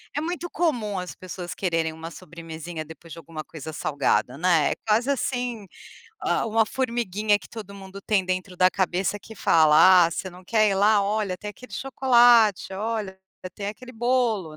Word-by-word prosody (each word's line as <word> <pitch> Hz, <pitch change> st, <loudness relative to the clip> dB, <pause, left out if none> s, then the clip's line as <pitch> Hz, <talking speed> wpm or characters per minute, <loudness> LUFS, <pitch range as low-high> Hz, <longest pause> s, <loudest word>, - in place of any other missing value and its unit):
é 295 Hz, -, 0 dB
muito 350 Hz, +1 st, -4 dB
comum 235 Hz, -, -1 dB
as 180 Hz, -, -7 dB
pessoas 180 Hz, -1 st, -7 dB
quererem 165 Hz, -4 st, -1 dB
uma 165 Hz, +1 st, -8 dB
sobremesinha 165 Hz, -2 st, -8 dB
depois 160 Hz, +1 st, -13 dB
de 165 Hz, -, -9 dB
alguma 160 Hz, -2 st, -8 dB
coisa 160 Hz, 0 st, -9 dB
salgada, 140 Hz, -3 st, 0 dB
né. 165 Hz, -3 st, +3 dB
É -, -, -12 dB
quase 230 Hz, +5 st, +2 dB
assim, 245 Hz, -5 st, -2 dB, 0.6 s
hã, -, -, +1 dB
uma 220 Hz, 0 st, +2 dB
formiguinha 220 Hz, -5 st, 0 dB
que -, -, -15 dB
todo 205 Hz, -3 st, -9 dB
mundo 195 Hz, 0 st, -10 dB
tem 200 Hz, -3 st, +1 dB
dentro 185 Hz, 0 st, -3 dB
da 185 Hz, 0 st, +4 dB
cabeça 190 Hz, +1 st, -1 dB
que 220 Hz, -, -12 dB
fala: 165 Hz, +3 st, +6 dB
"Ah, -, -, -4 dB
você 185 Hz, -, -4 dB
não 180 Hz, +1 st, -15 dB
quer 215 Hz, +1 st, +3 dB
ir -, -, +1 dB
lá, 205 Hz, +1 st, +4 dB
olha, 200 Hz, -2 st, -1 dB
tem 210 Hz, -, -6 dB
aquele 250 Hz, +5 st, -14 dB
chocolate, 240 Hz, -7 st, +4 dB
olha, 210 Hz, -2 st, -3 dB, 0.4 s
tem 200 Hz, -, -6 dB
aquele 255 Hz, +4 st, -9 dB
bolo." 225 Hz, -9 st, 0 dB
195 Hz, 175 wpm, -24 LUFS, 175-225 Hz, 0.6 s, fala